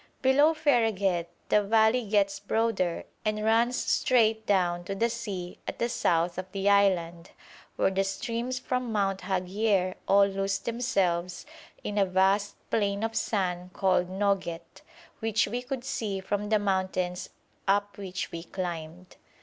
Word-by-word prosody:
Below 285 +5 +5
Fereghet 220 - +1 0.2
the 210 - +4
valley 220 +4 +3
gets 200 -1 +2
broader 205 -5 0 0.2
and 215 0 -1
runs 230 +3 +3
straight 220 -4 +2
down 175 -3 +1
to 195 - -4
the 230 +4 +1
sea 200 -7 -5
at - - -4
the 235 - 0
south 170 -3 +1
of 185 0 -7
the 195 0 -1
island, 175 -4 +2 0.5
where - - +2
the 195 0 +1
streams 235 +6 -3
from 250 -2 -2
Mount 195 -3 0
Haghier 185 +1 0
all 200 0 +6
lose 195 0 -1
themselves 190 -8 -1 0.4
in 210 0 -2
a 195 - +4
vast 195 +2 +2 0.2
plain 200 -1 0
of 225 0 -2
sand 180 -3 -1
called 185 -2 +1
Noget, 190 -3 -2 0.4
which 225 -1 +1
we 240 +4 -3
could 250 0 -5
see 215 -7 -3
from 205 +2 -3
the 220 - +4
mountains 185 -2 -1 0.4
up 205 +1 +1
which 190 -2 -5
we 165 - -5
climbed. 175 0 -6
200 Hz, 145 wpm, -28 LUFS, 185-225 Hz, 0.5 s, all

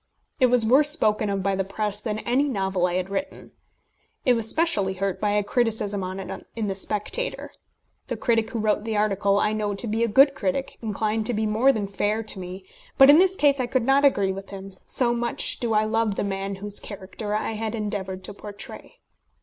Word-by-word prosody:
It 255 - +5
was 245 -2 +3
worse 275 +6 +5
spoken 215 -9 +1
of 195 -1 -2
by 195 +1 +1
the 195 - 0
press 205 +1 -2
than 215 -1 -3
any 250 +6 +1
novel 190 -5 0
I 175 - -2
had 185 +1 -2
written. 240 +8 -5 0.7
I 250 - +5
was 225 -2 0
specially 210 - +1
hurt 195 -1 -2
by 210 - +1
a 210 0 +2
criticism 210 -3 -1
on 185 +1 -5
it 190 - -7
in 225 -2 -2
the 195 - -1
Spectator. 210 - -2 0.6
The - - -3
critic 225 -2 +1
who - - -4
wrote 215 -1 +1
the 220 -1 -2
article 200 -1 +2
I 210 - +1
know 210 -1 -2
to 200 - -4
be 225 +1 0
a - - +2
good 275 +6 +5
critic, 275 -1 -3
inclined 215 0 -1
to 245 - 0
be 220 +1 0
more 220 +6 +3
than 215 -6 -2
fair 205 +3 -1
to 215 -2 -4
me; 185 +1 -8 0.3
but 270 +1 +9
in 300 - +7
this 380 0 +4
case 285 -5 +3
I 250 - 0
could 245 -1 0
not 270 +2 +4
agree 200 -9 +3
with 195 +1 -7
him, 195 -1 -9
so 240 -2 +1
much 235 0 -1
do 230 -3 0
I 210 - +4
love 220 -1 0
the - - -1
man 195 0 -3
whose 205 +1 -2
character 205 +1 -6
I 215 - -1
had 220 +1 -3
endeavoured 195 -3 -4
to - - -8
portray. 205 0 -10
215 Hz, 220 wpm, -24 LUFS, 195-235 Hz, 0.7 s, but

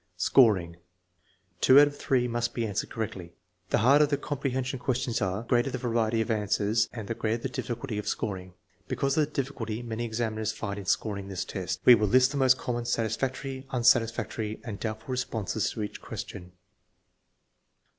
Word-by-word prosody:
Scoring. 95 -6 +4 0.8
Two 130 +2 +7
out 145 0 +7
ofjhree 130 -3 0
must 120 0 -2
be 115 - 0
answered 100 -3 -2
correctly. 95 -7 -5 0.4
The - - +3
harder 145 +3 +6
the 145 -1 0
comprehension 130 -3 -3
questions 125 -2 -1
are, 95 +2 -1
the - - -18
greater 120 +2 +2
the 130 - -3
variety 115 -2 0
of 115 - -1
answers 105 +1 +1
and 110 -4 -7
the 115 - -1
greater 115 +1 -2
the 135 - -1
difficulty 120 -2 -4
of 105 - -6
scoring. 95 -4 -3 0.3
Because 140 0 0
of 155 -2 +2
the - - -19
difficulty 120 -5 -3
many 115 0 -4
examiners 110 -1 -2
find 100 -1 -4
in 100 - -8
scoring 100 -1 -1
this 95 -2 -4
test, 95 -2 -4
we 125 - +10
will 105 -2 +3
list 130 +5 +4
the 145 - -3
most 130 -1 +5
common 120 -1 -3
satisfactory, 130 +4 -2
unsatisfactory, 115 -3 +1
and 105 -4 -6
doubtful 110 +3 -5
responses 115 -4 -1
to 110 - -4
each 105 - -6
question. 90 0 -8
115 Hz, 175 wpm, -28 LUFS, 105-130 Hz, 0.8 s, we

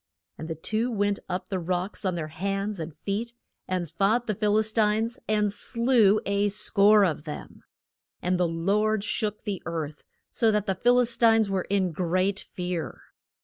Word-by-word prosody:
And 160 - -6
the 165 - -4
two 220 +9 -1
went 205 -3 0
up 180 +2 -4
the 190 -2 -1
rocks 180 +4 -3
on 185 -2 0
their 155 -2 -4
hands 195 +4 -3
and 160 0 -5
feet, 210 +9 -4 0.3
and 180 -2 -2
fought 200 +9 +1
with - - -30
the - - +2
Phil 210 -1 +2
is 220 0 +1
tines, 220 +1 +1
and 210 -1 +1
slew 230 -3 +3
a 200 +1 +1
score 205 0 +4
of 155 -3 -2
them. 150 - -8 0.6
And 180 0 0
the 180 - +3
Lord 200 +6 0
shook 215 -1 -2
the 205 -4 -4
earth, 155 -3 -5 0.3
so 230 - +2
that 210 -1 +1
the 195 - 0
Phil 245 +6 +3
is 240 -1 +2
tines 225 -3 +4
were 190 -2 -1
in 190 -3 +1
great 185 +3 0
fear. 180 -2 -5
200 Hz, 185 wpm, -26 LUFS, 180-215 Hz, 0.6 s, score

